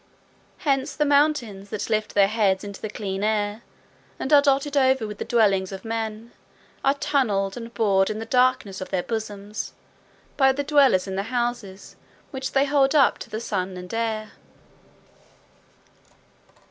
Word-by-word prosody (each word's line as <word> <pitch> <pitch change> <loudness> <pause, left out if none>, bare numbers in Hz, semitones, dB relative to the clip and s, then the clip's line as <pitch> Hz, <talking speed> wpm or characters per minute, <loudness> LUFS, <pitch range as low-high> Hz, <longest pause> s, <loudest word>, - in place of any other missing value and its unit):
Hence 275 0 0
the 300 - +1
mountains 280 -9 +1
that 215 -1 -4
lift 215 -1 -1
their 200 -1 +5
heads 200 -3 +1
into 200 -1 -8
the 215 - -4
clear 200 -2 -4
air, 210 0 0 0.6
and 285 - -2
are 285 - +8
dotted 280 +1 +1
over 265 -3 +3
with 210 -1 -7
the - - -3
dwellings 195 -5 +2
of 190 +1 -8
men, 225 0 -4 0.5
are 275 +1 +3
tunnelled 205 -10 0
and 230 -1 -8
bored 195 -4 +2
in 215 - -3
the 225 - -5
darkness 250 -6 +1
of 185 - -6
their 185 -2 -1
bosoms 210 -2 -5 0.6
by 270 -1 +5
the 285 +2 -2
dwellers 275 -10 +4
in 190 -1 -5
the - - +1
houses 240 -6 -4 0.3
which 265 -2 -5
they 275 +1 +3
hold 275 0 +2
up 280 -3 +4
to - - -9
the 215 0 -4
sun 190 -4 -3
and 180 +2 -9
air. 220 -1 -2
220 Hz, 160 wpm, -24 LUFS, 200-265 Hz, 0.6 s, are